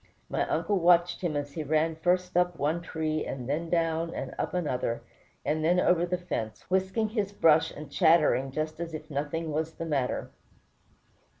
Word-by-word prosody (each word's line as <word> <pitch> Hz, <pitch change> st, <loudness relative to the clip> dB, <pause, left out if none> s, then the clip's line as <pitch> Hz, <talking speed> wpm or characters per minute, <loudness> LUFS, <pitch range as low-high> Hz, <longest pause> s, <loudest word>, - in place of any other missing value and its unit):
My -, -, -1 dB
uncle 205 Hz, -2 st, +1 dB
watched 175 Hz, 0 st, +4 dB
him 170 Hz, -4 st, -1 dB
as 145 Hz, -1 st, -3 dB
he 160 Hz, -, -3 dB
ran 155 Hz, +2 st, +1 dB
first 180 Hz, +2 st, 0 dB
up 180 Hz, -1 st, +2 dB
one 155 Hz, +4 st, 0 dB
tree, 155 Hz, -2 st, -2 dB
and 125 Hz, -2 st, -5 dB
then 160 Hz, +4 st, -2 dB
down 165 Hz, -1 st, 0 dB
and -, -, -5 dB
up -, -, -2 dB
another, 125 Hz, -8 st, -1 dB, 0.4 s
and 155 Hz, +1 st, 0 dB
then 175 Hz, +3 st, +3 dB
over 175 Hz, -1 st, +3 dB
the 180 Hz, +1 st, 0 dB
fence, 115 Hz, -11 st, -5 dB
whisking 190 Hz, +4 st, +1 dB
his 210 Hz, -3 st, -1 dB
brush 160 Hz, -6 st, +4 dB
and 150 Hz, -1 st, -10 dB
chattering 160 Hz, -5 st, +4 dB
just 155 Hz, +3 st, -3 dB
as 165 Hz, -2 st, -4 dB
if 155 Hz, +1 st, -9 dB
nothing 150 Hz, +3 st, -2 dB
was 160 Hz, +2 st, -2 dB
the 165 Hz, -, -5 dB
matter. 140 Hz, -6 st, -1 dB
165 Hz, 180 wpm, -28 LUFS, 150-175 Hz, 0.4 s, watched